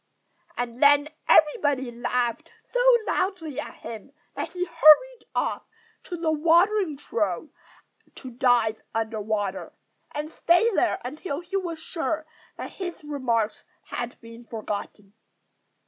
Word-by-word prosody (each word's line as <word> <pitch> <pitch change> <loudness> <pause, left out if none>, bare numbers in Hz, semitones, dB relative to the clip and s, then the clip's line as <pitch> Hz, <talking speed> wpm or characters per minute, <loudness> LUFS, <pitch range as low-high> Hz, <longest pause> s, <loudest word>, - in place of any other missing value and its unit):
And 245 0 -4
then 290 +1 +6 0.2
everybody 285 -4 +4
laughed 240 0 -2 0.2
so - - +1 0.3
loudly 340 -7 -1
at - - -6
him 230 +4 -9 0.2
that - - -4
he 360 0 -1
hurried 340 +9 +5
off - - -1 0.4
to 350 - -5
the 325 -1 0
watering 340 +2 +3
trough 220 - -2 0.7
to 260 - -9
dive 235 -3 +2
under 220 -1 -1
water, 205 -2 -3 0.4
and 300 +2 -5
stay 415 +7 +3
there 365 - +2
until 295 +3 -4
he 355 +2 -7
was 350 -4 -2
sure 320 -1 -3 0.3
that - - -6
his 355 -4 -6
remarks 240 -7 -1 0.3
had 240 0 -5
been 230 0 -12
forgotten. 210 -2 -6
290 Hz, 125 wpm, -25 LUFS, 230-335 Hz, 0.7 s, then